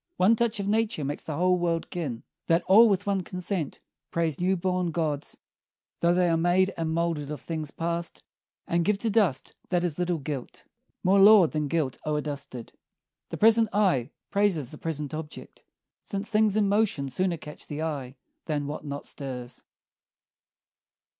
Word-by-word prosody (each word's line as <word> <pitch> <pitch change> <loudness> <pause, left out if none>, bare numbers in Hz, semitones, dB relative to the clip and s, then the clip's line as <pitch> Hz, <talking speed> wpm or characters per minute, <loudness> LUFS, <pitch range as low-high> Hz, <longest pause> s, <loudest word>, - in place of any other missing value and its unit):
One 200 +5 +5
touch 235 -1 0
of 200 - -2
nature 215 - 0
makes 145 +2 -4
the 155 - -4
whole 180 +2 +2
world 170 -1 -1
kin, 140 -10 -4 0.2
That 165 +1 +3
all 220 +4 +7
with 195 -3 +1
one 200 -1 +1
consent 180 -3 -3 0.3
praise 165 -3 -1
new 185 +2 +2
born 180 0 0
gawds, 155 -3 -2 0.6
Though 170 +1 +3
they 180 0 +3
are 165 - +3
made 180 +3 +2
and 165 -1 -2
moulded 165 -3 -1
of 150 -2 -5
things 155 +1 -4
past, 170 +2 -4 0.4
And 170 0 +1
give 210 +3 +2
to 225 +2 -1
dust 200 - +1 0.2
that 180 -1 +1
is 175 -2 -2
a - - +1
little 175 -1 0
gilt 140 -3 -6 0.4
More 195 +2 +4
laud 200 -4 +8
than 150 -1 -1
gilt 145 -3 -1
o'er 150 -1 0
dusted. 140 -5 -6 0.6
The - - -5
present 225 +1 +5
eye 180 - +2 0.2
praises 195 -10 +1
the 150 - -10
present 150 -3 -4
object, 155 0 -8 0.4
Since 200 +1 -4
things 215 -1 +3
in 210 -2 +3
motion 200 -9 +1
sooner 175 +6 -1
catch 150 -1 -10
the 150 +1 -4
eye 140 -5 -4 0.3
Than 150 -2 -1
what 145 +1 -5
not 145 -1 -6
stirs. 125 -3 -7
170 Hz, 175 wpm, -27 LUFS, 150-195 Hz, 0.6 s, laud